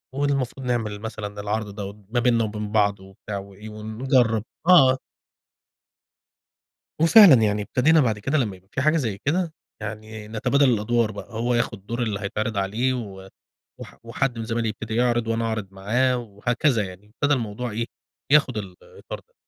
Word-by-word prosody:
والمفروض 135 -2 -1
نعمل 110 -4 -1
مثلًا 105 -2 -6
العرض 105 0 -3
ده 100 -1 -5 0.2
ما 120 - +3
بيننا 120 -1 +3
وبين 105 -1 -4
بعض 100 -2 +2
وبتاع 95 +2 -8
وإيه 100 +2 -10
ونجرب." 110 +1 +1 0.2
آه. 135 -7 +7 2.0
وفعلًا 170 -1 +9
يعني 105 -1 +1
ابتدينا 155 +9 +3
بعد 110 -6 +1
كده 135 +9 0
لما 105 -8 -1
يبقى 95 +1 -24
في 135 - -1
حاجة 155 +3 +3
زي 110 -9 -1
كده، 165 +2 0 0.3
يعني 110 0 -7
نتبادل 125 +5 +2
الأدوار 115 0 +1
بقى، 100 +3 -9
هو 120 +2 0
ياخد 110 -4 -2
دور 120 +1 -2
اللي 105 -4 -2
هيتعرِض 110 +1 -3
عليه 110 +7 0
و 95 -6 -7 0.5
وح - - -11
وحد 120 +1 -2
من 115 - -3
زمايلي 115 0 -1
يبتدي 110 +1 -5
يعرض، 120 -1 +2
وأنا 115 0 0
أعرض 110 -3 -2
معاه، 120 +7 +1
وهكذا 115 +2 0
يعني، 95 +3 -12
ابتدى 145 0 +2
الموضوع 120 0 -3
إيه، 115 +2 -2 0.5
ياخد 140 -6 +4
الإطار 95 -4 -8
ده. - - -36
115 Hz, 160 wpm, -24 LUFS, 105-125 Hz, 2.0 s, وفعلًا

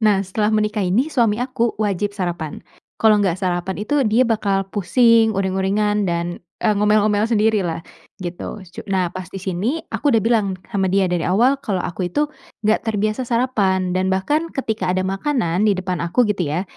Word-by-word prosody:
Nah 210 -3 +3
setelah 210 +3 -1
menikah 210 -1 0
ini, 240 - +1
suami 230 -6 +2
aku 240 -3 -1
wajib 205 -1 -1
sarapan, 175 -5 -4 0.4
kalau 215 -2 +5
enggak 190 -3 +1
sarapan 180 0 -2
itu 290 +4 +1
dia 225 +4 +4
bakal 200 -4 0
pusing, 225 +2 +3
uring-uringan, 195 +2 0
dan 170 0 -2 0.2
e 220 - +2
ngomel-ngomel 210 +1 +3
sendirilah, 210 -7 +1 0.4
gitu, 180 +3 -6
cu 175 -2 -10
nah 185 -3 0
pas 185 -2 -6
di 195 - -6
sini, 200 - -2
aku 290 - 0
udah 225 - +3
bilang 225 -2 +2 0.2
sama 195 -2 0
dia 195 -1 +3
dari 175 -2 0
awal 240 +9 +3
kalau 190 -4 -1
aku 180 +1 -3
itu 295 +9 +1 0.4
enggak 215 +1 +2
terbiasa 215 +2 0
sarapan 205 -7 +1
dan 185 0 +1
bahkan 295 +13 0
ketika 220 -8 -2
ada 185 +1 +1
makanan 195 - 0
di 205 - +4
depan 185 -1 -3
aku, 175 +9 +2
gitu 180 -5 -1
ya, 155 +6 -1
205 Hz, 175 wpm, -20 LUFS, 185-220 Hz, 0.4 s, kalau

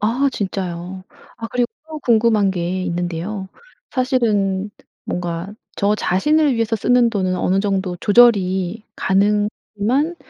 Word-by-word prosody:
아 240 +7 +2
진짜요. 185 -2 -4 0.3
아 230 - -5
그리고 245 -1 0 0.2
또 310 -1 -6
궁금한 220 -5 +3
게 180 0 -2
있는데요. 175 +3 -3 0.4
사실은 210 -6 0 0.3
뭔가 175 +2 -4 0.2
저 205 +1 +2
자신을 290 - +2
위해서 230 -1 0
쓰는 240 +2 +3
돈은 185 -3 -1
어느 190 +2 +1
정도 190 -3 -1
조절이 200 -3 +3
가능하지만 210 - 0
205 Hz, 260 characters per minute, -20 LUFS, 185-230 Hz, 0.4 s, 궁금한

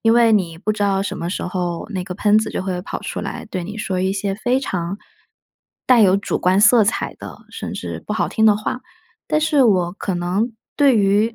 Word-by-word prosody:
因 225 0 +3
为 230 -2 +5
你 175 -6 +1
不 215 +5 -1
知 210 - -3
道 195 -1 +1
什 - - -4
么 170 - -3
时 185 - -3
候 175 -2 -3
那 185 -3 -3
个 180 -1 -6
喷 210 +2 +3
子 220 - -1
就 - - -3
会 185 -2 -3
跑 - - -6
出 - - -4
来 - - -5
对 185 -2 -3
你 210 +4 -7
说 190 -3 -2
一 190 +1 0
些 195 0 -2
非 245 +5 0
常 180 -5 -3 0.9
带 250 -2 +6
有 195 -2 +5
主 200 - -2
观 185 +2 +2
色 225 0 +6
彩 205 - -1
的， - - -10
甚 - - -6
至 - - -6
不 - - -2
好 - - 0
听 220 -1 +3
的 210 -1 +5
话。 215 +4 -4 0.5
但 305 - +2
是 300 -4 +3
我 180 -6 +2
可 195 -1 -4
能 185 +7 -1 0.2
对 275 -5 +4
于， 205 +3 +2
200 Hz, 250 characters per minute, -20 LUFS, 185-220 Hz, 0.9 s, 带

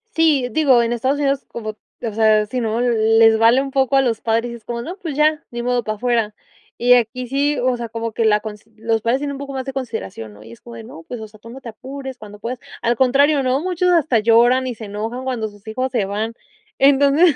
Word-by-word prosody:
Sí, 305 -6 +3
digo 265 -3 +4
en 235 0 -1
Estados 260 +4 0
Unidos 275 -1 0
como 215 -2 -7 0.2
o 230 -3 -3
sea, 215 -1 +3
sí, 250 +4 -3
¿no? 225 0 -1
Les 225 -2 +4
vale 230 +4 +5
un 275 0 -5
poco 270 0 +1
a - - +5
los 235 -4 -1
padres, 230 +1 0
es 230 - -14
como, 235 +1 -4
no, 335 +9 -6
pues, 320 -7 -6
ya 305 +1 +2
ni 240 0 -4
modo 245 0 0
para 215 0 -3
afuera. 230 -2 0 0.4
Y 245 +1 +5
aquí 245 +1 +1
sí, 280 +2 0
o 255 0 +1
sea, 235 -1 -6
como 230 0 -4
que 230 - 0
la 210 -1 +4
cons 210 -1 -9
los 225 0 -1
padres 235 +4 +1
tienen 285 0 -3
un - - -7
poco 280 0 -7
más 265 -1 -4
de 270 - -5
consideración, 220 - -6
¿no? 105 - -16
Y 115 +2 -12
es - - -16
como 115 -1 -11
de: 115 - -9
"No, 160 - -11
pues, 245 +8 -7
o 220 - -7
sea, 215 0 -19
tú 230 - -12
no 255 +3 -9
te 255 - -12
apures 265 +3 -8
cuando 210 -2 -12
puedas", 240 +4 -4 0.2
al 235 +1 +1
contrario, 275 +4 +3
¿no? 260 +1 +1
Muchos 360 +2 0
hasta 315 -9 +3
lloran 235 +4 +4
y 250 -2 -4
se 220 - -9
enojan 220 +5 -5
cuando 235 -4 -2
sus 205 0 -19
hijos 255 +4 -2
se 230 -6 0
van. 215 +3 -3 0.5
Entonces 280 +4 +5
240 Hz, 250 wpm, -20 LUFS, 220-270 Hz, 0.5 s, vale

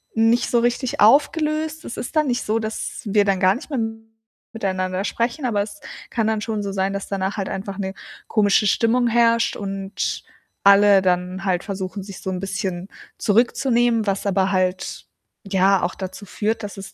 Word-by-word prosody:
nicht 225 +2 +3
so 240 - +3
richtig 240 +2 -1
aufgelöst. 305 +6 +3
Es - - -7
ist 245 - -6
dann 305 -1 +3
nicht 250 -1 0
so, 220 +2 +1
dass 220 0 -5
wir 205 0 +3
dann 195 -2 +1
gar 185 0 +5
nicht 280 - -9
mehr 275 -4 -2 0.7
miteinander 185 -3 -2
sprechen, 235 +7 -2
aber 215 -5 +1
es 205 0 -6 0.3
kann 225 -3 0
dann 220 -1 +1
schon 215 -2 -3
so 200 - -3
sein, 195 0 -1
dass 200 0 -4
danach 195 0 -2
halt 195 -2 -2
einfach 195 0 -5
'ne 190 -1 -3 0.4
komische 210 -1 +3
Stimmung 240 +4 +2
herrscht 230 0 +3
und 195 -1 -4 0.4
alle 200 0 +7
dann 180 +1 -1
halt 180 -2 0
versuchen, 195 -1 -5
sich 195 -1 -10
so - - -4
'n 185 - -3
bisschen 190 -1 -3 0.3
zurückzunehmen, 235 0 +2
was 195 0 -1
aber 195 -1 +1
halt 185 0 -1 0.4
ja 195 0 +3
auch 175 - 0
dazu 190 +2 -7
führt, 220 +3 -2
dass 200 - -7
es 195 0 -9
205 Hz, 180 wpm, -22 LUFS, 190-230 Hz, 0.7 s, alle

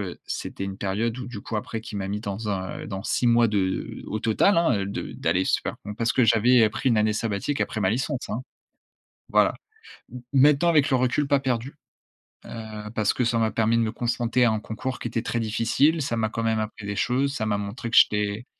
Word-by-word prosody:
heu, - - -30
c'était 95 - -4
une 95 0 -6
période 110 +5 -1
où 130 - -6
du 120 -4 -7
coup, 115 - -5
après 115 +2 -4
qui 110 -1 -8
m'a 95 -1 -3
mis 105 +1 -2
dans 105 +1 -4
un, 95 -2 -3
heu, - - -8
dans 95 0 -5
6 125 - +1
mois 120 0 +5
de 105 -1 0
heu, 95 0 -3
au 110 - -3
total, 115 - +3
hein, 170 -6 +3
heu, 100 - -2
de 100 - -5
d'aller 95 +1 0
se - - +2
faire - - -3
bon, 105 - -5
parce 115 +1 0
que 125 - +4
j'avais, 115 +2 +5
heu, - - +1
pris 130 - -1
une 115 - +3
année 105 0 +2
sabbatique 110 +5 -2
après 110 - -2
ma 95 - +2
licence, 130 +3 -2
hein. 115 - -3 0.9
Voilà, - - +4 0.6
m 125 -1 -8
maintenant 145 +4 +5
avec 150 -4 +4
le 130 - +4
recul, 130 +3 +1
pas 140 -1 +3
«perdus», 130 0 -2 0.7
heu, 110 -2 -7
parce 105 -2 +2
que - - 0
ça 120 0 +1
m'a 110 -1 +2
permis 115 +1 +2
de - - +2
me 110 -1 -1
concentrer 120 +1 0
à - - +4
un 110 - -1
concours 125 +4 -5
qui 120 - -3
était 115 - -2
très 120 0 -2
difficile. 115 +9 +2
Ça 125 -4 -2
m'a 110 -1 0
quand 115 - -3
même 110 -1 +1
appris 105 -1 -6
des 100 0 -3
choses, 135 +5 0
ça 110 - -2
m'a 105 -1 0
montré 105 +4 -5
que - - +1
j'étais 105 +2 +3
115 Hz, 245 wpm, -25 LUFS, 105-125 Hz, 0.9 s, mois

